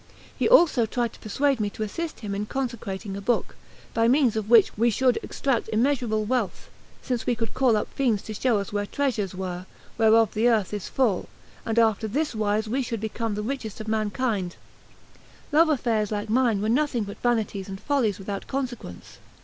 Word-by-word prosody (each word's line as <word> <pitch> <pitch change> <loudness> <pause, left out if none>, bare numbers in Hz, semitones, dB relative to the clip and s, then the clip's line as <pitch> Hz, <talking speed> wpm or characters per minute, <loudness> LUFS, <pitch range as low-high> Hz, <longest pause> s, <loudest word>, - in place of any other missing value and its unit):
He - - +1
also 330 - +5
tried 235 0 -1
to - - -15
persuade 270 +5 0
me 210 -1 0
to 215 - -5
assist 320 +9 -5
him 205 -3 -4
in 205 +1 -3
consecrating 215 -7 -4
a 200 - -5
book, 240 +4 0 0.4
by 230 0 +3
means 255 -2 +3
of 215 -1 -3
which 230 -4 +6
we 235 +3 +3
should 250 +2 +2
extract 255 -5 -1
immeasurable 230 -2 +1
wealth, 240 -3 -2 0.3
since 250 -3 -2
we 245 - +2
could 225 -1 -4
call 250 -5 +3
up 210 - -2
fiends 235 -7 +1
to 215 - -6
show 230 +1 +1
us 200 0 -4
where 205 0 -1
treasures 225 -10 -1
were, 185 -1 -5 0.3
whereof 225 -1 +5
the 225 +3 +3
earth 215 -4 +1
is 205 -3 -4
full; 235 -8 0 0.4
and 225 0 -1
after 220 -1 +3
this 290 +8 -1
wise 215 0 0
we 255 +5 0
should 230 -3 -3
become 220 0 -3
the 210 - -3
richest 225 -3 -4
of 215 - -7
mankind: 215 -3 -1 1.0
love 315 +2 +5
affairs 225 -7 0
like 210 0 -3
mine 230 -4 +2
were - - 0
nothing 255 -2 +1
but 200 0 -8
vanities 215 -5 0
and 195 0 -6
follies 250 -8 0
without 195 0 -5
consequence. 245 - -5
225 Hz, 190 wpm, -25 LUFS, 210-250 Hz, 1.0 s, which